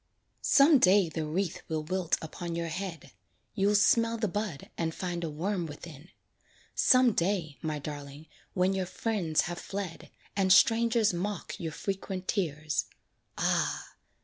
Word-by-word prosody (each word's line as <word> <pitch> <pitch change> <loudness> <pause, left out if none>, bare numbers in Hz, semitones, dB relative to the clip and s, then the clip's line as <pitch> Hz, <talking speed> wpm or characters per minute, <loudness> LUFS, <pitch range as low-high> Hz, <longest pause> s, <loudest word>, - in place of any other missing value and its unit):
Some 285 0 +6
day 190 -3 +5
the 160 -1 -3
wreath 175 +3 -2
will 155 -1 -2
wilt 180 +1 0
upon 170 +1 -5
your 170 0 -2
head; 165 -5 -6 0.4
You'll 200 +1 +2
smell 230 +2 +4
the 220 -1 0
bud 205 -6 -4
and 160 -1 -2
find 175 -2 -3
a 165 - -2
worm 175 +3 -2
within. 150 +1 -10 0.6
Some 255 -1 +5
day, 170 -5 -1
my 155 -1 -2
darling, 145 0 -8 0.3
when 185 +1 +2
your 190 -2 -2
friends 185 -7 0
have 175 0 -4
fled, 195 -4 -6 0.3
And 190 -2 +2
strangers 230 +1 +5
mock 190 +2 -4
your 165 -2 -3
frequent 190 +1 -4
tears, 155 -6 -1 0.5
ah! - - 0
180 Hz, 145 wpm, -29 LUFS, 160-200 Hz, 0.6 s, Some